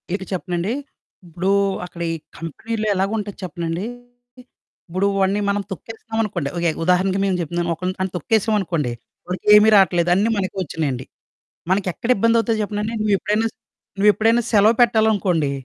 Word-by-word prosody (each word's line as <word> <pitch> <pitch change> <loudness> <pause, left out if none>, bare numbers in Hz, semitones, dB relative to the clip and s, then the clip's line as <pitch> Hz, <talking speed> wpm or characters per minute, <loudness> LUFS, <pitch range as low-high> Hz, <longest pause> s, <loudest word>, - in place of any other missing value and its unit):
ఇక 190 - -5
చెప్పనండి? 180 +3 -2 0.5
ఉప్పుడు 175 +3 -3 0.4
అక్కడ 175 -1 -10
ఈ 165 - -2 0.2
కంపెనీలో 215 +7 -4
ఎలాగుంటది 205 +1 -2
చెప్పనండి? 170 +1 -3 1.0
ఇప్పుడు 185 +3 0
వాడిని 195 +2 +2
మనం 205 0 0
తొక్కేస్తున్నాం 225 +3 -6
అనుకోండి. 175 -9 -3
ఇలాగె 170 -1 0
ఉదాహరణకి 185 +2 +2
మేము 190 -2 +1
చెప్తున్నాను. 170 +1 -2
ఒకని 185 +3 -3
గాని 190 -1 -1
తొక్కేసామనుకోండి. 185 - 0 0.4
వాడికెమీ 210 +3 +5
రాట్లేదు. 175 -3 +3
అన్నీ 210 +4 +2
మనకే 190 0 -2
వచ్చునాయండి. 140 -6 -3 0.7
మనకెక్కడ 195 +4 -1
ఇబ్బందవుతదో 230 0 +3
చెప్పనా 205 0 -3
అండి. 225 +2 -3
నువ్వెప్పుడైనా 210 +2 +1
స - - -40 0.5
నువ్వెప్పుడైనా 220 +3 +4
సెలవు 215 +2 +5
పెట్టాలనుకోండి. 205 -10 +2
195 Hz, 130 wpm, -21 LUFS, 175-215 Hz, 1.0 s, వాడికెమీ